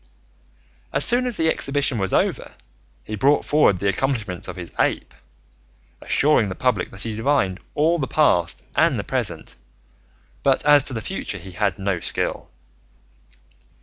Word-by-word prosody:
As - - +3
soon 250 +2 +5
as 245 - -3
the 160 - +1
exhibition 140 -5 0
was 95 -1 -1
over - - -1 0.5
he 110 - -8
brought 135 +8 +2
forward 150 -10 +3
the 100 - -2
accomplishments 110 -4 -2
of - - -7
his 90 -2 -8
ape, - - 0 0.9
assuring 140 -8 +2
the 95 - -5
public 125 -8 0
that 95 - -4
he 115 -2 -4
divined 110 -6 0 0.2
all 165 +3 +2
the 135 - -2
past 90 - +1
and - - +3
the - - -3
present, - - -4 0.8
but 135 0 +1
as 145 -1 +6
to 135 - -1
the 115 -2 -4
future - - -4
he 95 - -11
had 100 +1 -1
no 95 -2 -2
skill. - - -3
115 Hz, 155 wpm, -22 LUFS, 95-145 Hz, 0.9 s, as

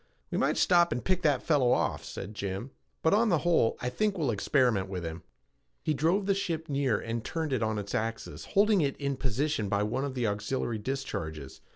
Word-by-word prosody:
"We - - -1
might - - +1
stop 175 -1 +4
and 120 - -2
pick 185 -1 +1
that 150 -4 +2
fellow 140 -6 +3
off," - - 0
said 105 - -7
Jim, 100 +4 -4 0.3
"but, 160 - +4
on 220 +2 +4
the 175 - +4
whole, 165 -10 +3
I 125 - -1
think 205 +9 0
we'll 150 -7 +1
experiment 110 -3 +2
with 90 -2 -4
him." 80 +1 -5 0.6
He 155 - +1
drove 165 +8 +1
the 200 - +3
ship 170 -5 -2
nearer 135 -5 +1
and 115 0 -4
turned 160 -4 -2
it 125 - 0
on 110 -1 0
its 100 -1 -5
axis, 115 0 -3
holding 205 -1 +3
it 140 -2 0
in 140 -1 -1
position 130 -3 -1
by 100 0 +1
one 115 +6 -1
of 140 -2 -3
the 125 -2 0
auxiliary 110 +2 -1
discharges. 80 - -5
130 Hz, 210 wpm, -29 LUFS, 110-160 Hz, 0.6 s, stop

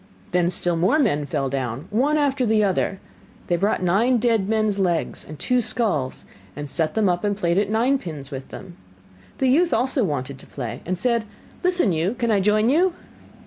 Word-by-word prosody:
Then 175 -1 +2
still 175 -1 0
more 185 - +2
men 150 - +1
fell 140 -1 -1
down, 130 0 -3
one 275 +8 +2
after 280 -3 +1
the 220 -2 +3
other; 195 0 0 0.5
they 175 - +1
brought 200 +2 0
nine 220 +8 +3
dead 225 -4 +1
men's 215 -2 +1
legs 175 -4 0
and 155 - -10
two 250 +8 +1
skulls, 215 - -1 0.3
and 145 +1 -5
set 160 +2 -1
them 220 -2 +2
up 175 +1 0
and 205 -1 0
played 175 -1 +1
at 205 -1 0
nine 245 +6 +2
pins 150 - -7
with 135 -1 -6
them. 180 -3 -11 0.6
The 265 - +1
youth 330 +7 +3
also 260 0 +1
wanted 140 -6 -3
to - - -14
play 120 -5 -6
and 185 +1 -1
said: 235 +2 0 0.4
'Listen 360 - +2
you, 170 +7 0
can 235 -1 0
I 205 - +3
join 210 +3 +2
you? 350 +4 +3
200 Hz, 195 wpm, -23 LUFS, 165-240 Hz, 0.6 s, the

